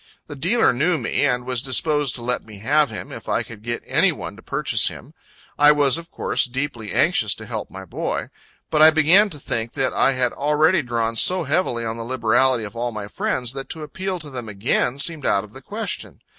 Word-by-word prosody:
The 145 - -9
dealer 180 - +2
knew 160 +7 +1
me, 145 - 0
and 125 -2 -1
was 125 -2 -1
disposed 145 +1 +1
to 120 - -7
let 125 +1 -1
me 110 -2 -13
have 145 +7 +2
him, 105 - -7
if - - -8
I - - +1
could 110 -3 -12
get 120 +1 -4
any - - +3
one - - -7
to - - -14
purchase - - +1
him. - - -7 0.5
I 145 +1 +8
was, 145 0 +3
of 170 0 -12
course, - - 0
deeply 125 -4 -4
anxious 115 - +2
to 110 - -10
help 110 -1 -5
my 95 0 -9
boy; - - -3 0.4
but 155 - +2
I 155 - +10
began 165 +7 +5
to 155 - -6
think 115 -4 -3
that 130 -1 -1
I 135 - +3
had 125 -2 0
already 150 +5 +2
drawn 115 -3 -2
so 180 +9 +4
heavily 140 -6 0
on 115 0 -3
the 115 - -5
liberality 120 0 +2
of 105 +2 -8
all 120 +1 -2
my 105 -2 -6
friends, 125 +3 -2
that 135 0 -7
to 160 -2 -6
appeal 185 +5 -4
to 150 -4 -8
them 120 -4 -6
again 115 +5 0
seemed 155 +1 0
out 100 - +2
of 105 - -14
the 135 - -11
question. 215 +6 -5
130 Hz, 225 wpm, -22 LUFS, 115-150 Hz, 0.5 s, I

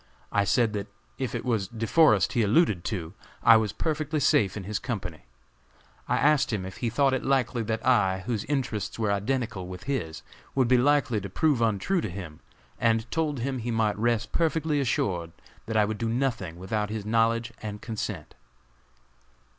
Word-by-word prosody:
I 100 0 +2
said 110 +3 +2
that 100 -1 -4 0.3
if 130 -4 -2
it - - -4
was 110 -6 0
De 115 +3 -4
Forest 110 - +4
he 120 - +2
alluded 105 - +3
to, 85 -6 -4 0.3
I 115 - +8
was 110 -2 +2
perfectly 155 +2 -2
safe 105 -7 +3
in 100 - -5
his 105 +2 -3
company. 90 - -5 0.8
I - - +1
asked 150 -2 +3
him 100 -4 -2
if 95 - -8
he 120 - -1
thought 135 +3 +2
it 130 - -1
likely 130 -3 +1
that 110 0 -3
I, 95 -7 +3
whose 110 -4 -2
interests 125 -8 -2
were 110 -3 0
identical 105 -2 -2
with 90 0 -8
his, 95 - -3 0.3
would 130 -3 +3
be 125 0 +4
likely 130 -5 +2
to 100 - -6
prove 145 +4 +1
untrue 115 - +1
to 110 - -3
him, 85 -4 -8 0.4
and 115 0 +1
told 150 -5 -1
him 130 +1 -2
he 120 +1 -4
might 110 -2 +1
rest 120 +1 0
perfectly 160 -2 +1
assured 90 -10 -1 0.3
that 110 -1 -1
I 105 - +5
would 105 0 -4
do 115 - -1
nothing 115 -9 -1
without 105 +3 -2
his 105 -1 -4
knowledge 115 +1 +1
and 105 -1 -5
consent." 105 -8 -5
115 Hz, 185 wpm, -27 LUFS, 100-130 Hz, 0.8 s, I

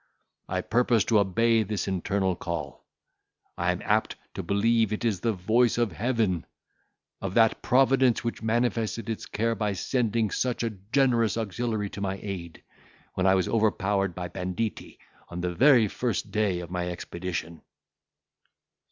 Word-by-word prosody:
I - - -1
purpose 120 -2 +2
to 110 -3 +4
obey 115 +4 +3
this 105 -1 -2
internal 95 0 0
call. 85 -6 -5 0.7
I - - +1
am - - -4
apt - - +1 0.2
to - - -4
believe 110 +4 +2
it 105 +2 -2
is 105 -5 +1
the 115 +5 +1
voice 110 +5 +2
of 120 -4 +1
Heaven—of 100 -3 -4
that 115 -1 +4
Providence 130 -2 +3
which 115 - -3
manifested 115 0 -1
its 110 - -5
care 115 +2 0
by 105 -2 -1
sending 115 +1 0
such 125 -2 -1
a 115 - -1
generous 115 +3 +1
auxiliary 110 -1 -2
to 100 - -7
my 95 -1 -2
aid, 90 -5 -6 0.5
when 95 0 +1
I 95 - +5
was 95 -2 +1
overpowered 100 -4 +1
by 90 -1 -4
banditti, 90 +5 -4 0.3
on 90 0 -5
the 90 0 -2
very 125 0 +5
first 105 - -2
day 100 -5 0
of 85 0 -9
my 90 -1 -2
expedition." 85 -1 -5
105 Hz, 150 wpm, -27 LUFS, 95-115 Hz, 0.7 s, I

